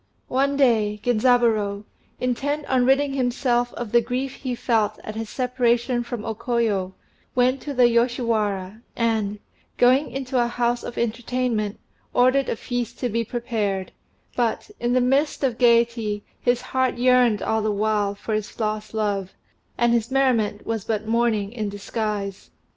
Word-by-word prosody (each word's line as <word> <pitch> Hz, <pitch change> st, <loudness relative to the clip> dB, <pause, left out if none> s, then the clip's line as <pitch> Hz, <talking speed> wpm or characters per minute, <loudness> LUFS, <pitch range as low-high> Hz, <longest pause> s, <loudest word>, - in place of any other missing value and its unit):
One 275 Hz, +2 st, +1 dB
day 220 Hz, -6 st, +3 dB
Genzaburô, 225 Hz, -4 st, +2 dB, 0.4 s
intent 285 Hz, +4 st, -1 dB
on 255 Hz, -1 st, +2 dB
ridding 275 Hz, +1 st, +3 dB
himself 245 Hz, -2 st, +1 dB
of 235 Hz, -3 st, -5 dB
the 235 Hz, -, +5 dB
grief 250 Hz, +3 st, -3 dB
he 255 Hz, -2 st, -3 dB
felt 225 Hz, -3 st, +1 dB
at 215 Hz, -, -6 dB
his 220 Hz, 0 st, -5 dB
separation 245 Hz, -1 st, +1 dB
from 240 Hz, -2 st, -5 dB
O 225 Hz, -, -2 dB
Koyo, 215 Hz, -5 st, -1 dB, 0.4 s
went 255 Hz, +1 st, +2 dB
to 290 Hz, -, -5 dB
the 250 Hz, -1 st, +6 dB
Yoshiwara, 225 Hz, -4 st, 0 dB
and, 220 Hz, -3 st, 0 dB, 0.4 s
going 255 Hz, +4 st, +4 dB
into 260 Hz, -2 st, -1 dB
a -, -, 0 dB
house 240 Hz, 0 st, 0 dB
of -, -, -7 dB
entertainment, 235 Hz, -2 st, -1 dB, 0.4 s
ordered 255 Hz, +2 st, +3 dB
a -, -, 0 dB
feast 245 Hz, 0 st, -4 dB
to 250 Hz, -, -2 dB
be 230 Hz, +1 st, 0 dB
prepared, 220 Hz, -5 st, -2 dB, 0.4 s
but, 240 Hz, -, -1 dB
in 240 Hz, 0 st, 0 dB
the 255 Hz, -, +3 dB
midst 275 Hz, +4 st, +1 dB
of 250 Hz, -3 st, 0 dB
gaiety, 235 Hz, -3 st, +2 dB, 0.2 s
his 245 Hz, 0 st, +1 dB
heart 260 Hz, -1 st, 0 dB
yearned 250 Hz, -3 st, +4 dB
all 220 Hz, 0 st, +1 dB
the 215 Hz, -, 0 dB
while 205 Hz, -1 st, 0 dB
for 215 Hz, +2 st, -5 dB
his 215 Hz, +1 st, -3 dB
lost 215 Hz, 0 st, -2 dB
love, 200 Hz, -3 st, -1 dB, 0.4 s
and 240 Hz, 0 st, +3 dB
his 235 Hz, 0 st, +1 dB
merriment 245 Hz, -6 st, +1 dB
was 225 Hz, -3 st, -2 dB
but 215 Hz, -1 st, -2 dB
mourning 225 Hz, -3 st, +1 dB
in 215 Hz, -4 st, -3 dB
disguise. 205 Hz, -1 st, -4 dB
235 Hz, 155 wpm, -23 LUFS, 215-250 Hz, 0.4 s, the